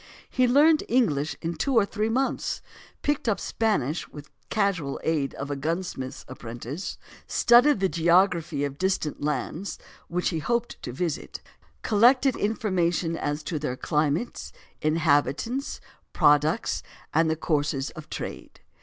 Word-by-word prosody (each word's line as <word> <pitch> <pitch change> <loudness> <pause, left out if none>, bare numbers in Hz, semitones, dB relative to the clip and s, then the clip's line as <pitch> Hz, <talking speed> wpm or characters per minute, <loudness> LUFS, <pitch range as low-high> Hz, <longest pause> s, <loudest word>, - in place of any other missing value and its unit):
He 255 -1 +3
learned 300 +5 +5
English 160 - +2
in 165 +1 -1
two 255 - -1
or 225 -3 +5
three 215 +2 -1
months; 265 +4 -1 0.4
picked 290 -5 0
up 205 - +1
Spanish 175 - -1
with 145 -1 -10
the - - -29 0.2
casual 195 -10 0
aid 150 -4 0
of 140 +1 -5
a - - -1
gunsmith's 150 -3 -4
apprentice; 120 - -6 0.3
studied 240 +2 +5
the 190 - +4
geography 170 -3 +2
of 140 -1 -2
the - - -21
distant 185 -5 -1
lands 150 +5 -2 0.3
which 180 +1 0
he 165 - -2
hoped 235 +8 -2
to 125 - -5
visit; 160 +4 -3 0.4
collected 250 +5 +4
information 180 -6 0
as 145 -1 -2
to 155 0 -3
their 130 -4 -3
climates, 150 - -1 0.3
inhabitants, 160 - +1 0.3
products, 150 +8 +3 0.3
and 160 +1 +3
the 160 - +1
courses 150 -3 -1
of 155 - -11
trade. - - -7
165 Hz, 140 wpm, -26 LUFS, 150-220 Hz, 0.4 s, learned